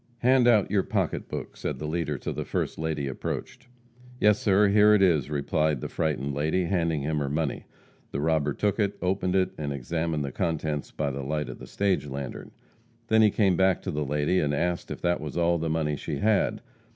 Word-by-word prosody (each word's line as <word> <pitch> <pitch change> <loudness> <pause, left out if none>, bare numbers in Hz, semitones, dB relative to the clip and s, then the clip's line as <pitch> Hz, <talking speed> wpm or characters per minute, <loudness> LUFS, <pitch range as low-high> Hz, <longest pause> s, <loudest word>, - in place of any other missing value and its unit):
"Hand 125 0 +4
out 110 -5 +4
your 100 -2 +3
pocketbook," - - -3
said 75 - -4
the 75 - -5
leader 75 -2 -2
to - - -4
the - - -3
first - - -3
lady 80 -3 -2
approached. 65 - -5 0.5
"Yes, 105 0 +4
sir, 100 0 +4
here 105 +1 +6
it 105 - +3
is," 80 -7 +3
replied 75 0 0
the - - -4
frightened 70 -3 -1
lady, 80 +6 0
handing 85 -5 0
him 75 +1 -1
her 70 -1 -1
money. 75 -2 -2 0.4
The 70 - -4
robber 75 -1 +1
took 105 +5 -1
it, 100 -1 0
opened 90 0 0
it, 95 -1 +2
and 75 -2 -3
examined 80 +3 -2
the 70 - -4
contents 80 -2 -2
by 70 -2 -2
the 70 +1 -4
light 75 +2 -2
of - - -8
the - - -10
stage 100 -6 0
lantern. 70 -1 -6 0.6
Then 110 0 +5
he 110 - +6
came 100 -3 +2
back 95 0 +3
to 95 - -3
the 75 -1 -1
lady, 75 +6 +1
and 75 -1 0
asked 85 +3 -1
if - - -6
that 85 -2 +1
was 75 +2 -5
all 85 0 +2
the 80 0 -2
money 80 -2 0
she - - -4
had. 105 0 +1
80 Hz, 210 wpm, -27 LUFS, 75-95 Hz, 0.6 s, here